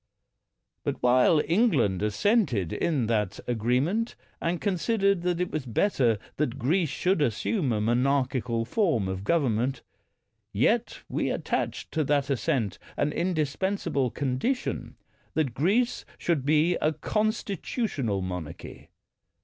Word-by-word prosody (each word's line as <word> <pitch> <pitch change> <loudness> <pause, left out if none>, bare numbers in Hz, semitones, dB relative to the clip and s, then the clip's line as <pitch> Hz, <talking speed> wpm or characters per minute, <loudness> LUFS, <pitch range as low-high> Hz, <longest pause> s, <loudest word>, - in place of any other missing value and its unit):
But - - -1
while 125 +5 +5
England 160 - +2
assented 110 - +1
to 145 -8 0
that 105 -3 0
arrange 120 +3 +1
ment, 225 +7 -1 0.3
and 170 +1 0
considered 200 0 +1
that 175 -1 0
it 180 - -1
was 150 -4 -3
better 120 - +2 0.2
that 135 -4 -1
Greece 155 +6 +1
should 185 +2 +1
assume 140 - 0
a 110 - +1
monarchical 125 0 +1
form 125 - +1
of 95 0 -4
government, 130 -3 +1 0.7
yet 220 - +1
we - - -1
attached - - -2
to 160 - +1
that 140 -1 +1
assent 115 -6 0 0.2
an 145 +1 +1
indispensable 160 -3 0
condition 140 - -2 0.4
that 150 -6 +1
Greece 210 - +1
should 150 -6 -1
be 155 +4 +3
a 155 - +1
constitutional 200 - -1
monarchy. 90 -4 -7
145 Hz, 120 wpm, -27 LUFS, 120-180 Hz, 0.7 s, while